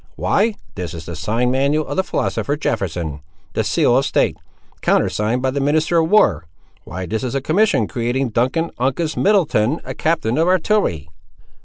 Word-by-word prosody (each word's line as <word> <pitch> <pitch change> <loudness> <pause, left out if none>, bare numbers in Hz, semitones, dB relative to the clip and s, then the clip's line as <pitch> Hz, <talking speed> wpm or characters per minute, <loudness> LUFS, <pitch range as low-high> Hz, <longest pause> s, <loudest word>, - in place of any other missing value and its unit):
"Why, 215 +1 +1 0.2
this 90 -3 -5
is 80 -1 -8
the 85 - -6
sign 115 +10 0
manual 140 +4 +1
of - - -5
the 190 - +1
philosopher, 145 -5 -2
Jefferson! 85 - -2 0.3
The - - 0
seal - - +2
of - - +3
state! - - +1 0.5
Countersigned 115 +5 +1
by 130 - +1
the 140 - -2
minister 155 +4 +2
of 160 0 +1
war! 85 - +3 0.4
Why 95 +3 -5
this 110 +7 -3
is 125 0 -3
a - - +2
commission 195 +11 +2
creating 125 +1 -1
Duncan 130 +9 0
Uncas 135 +6 -1
Middleton 160 - +2
a - - -5
captain 155 -6 0
of 165 - +3
artillery!" 185 - +1
130 Hz, 170 wpm, -19 LUFS, 105-160 Hz, 0.5 s, of